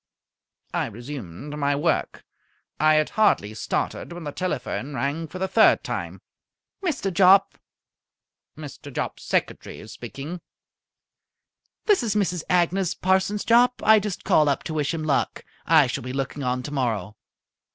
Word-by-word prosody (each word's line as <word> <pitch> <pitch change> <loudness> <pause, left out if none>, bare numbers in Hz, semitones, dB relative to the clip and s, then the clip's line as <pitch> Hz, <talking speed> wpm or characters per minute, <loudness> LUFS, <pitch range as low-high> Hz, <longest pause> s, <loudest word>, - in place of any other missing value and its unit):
I - - 0
resumed 120 - -8
my 145 0 +1
work. 160 +4 -1 0.5
I 155 0 +5
had 155 0 +1
hardly 205 - +2
started 110 - -3
when 175 0 -7
the 145 - -4
telephone 145 -5 -3
rang 145 +5 -2
for 170 - -8
the 190 +1 -1
third 220 +4 +4
time. - - -5 0.6
"Mr. 285 - -1
Jopp?" 195 +2 +5 1.0
"Mr. 145 -1 -9
Jopp's - - -4
secretary - - -3
speaking." 135 +10 -8 1.4
"This 415 -6 +4
is 220 -4 -1
Mrs. 180 -5 0
Agnes 180 +1 +1
Parsons 190 +2 +1
Jopp. 245 +2 +4
I 220 0 +7
just 205 -2 -5
called 150 -1 +4
up 140 - -1
to 160 - -5
wish 150 -2 0
him 165 -2 -3
luck. 150 -3 -1 0.2
I 160 -3 +6
shall 125 - -4
be 125 +1 -5
looking 135 +1 -3
on 125 -1 -1
tomorrow." 115 -8 -2
155 Hz, 140 wpm, -24 LUFS, 140-190 Hz, 1.4 s, I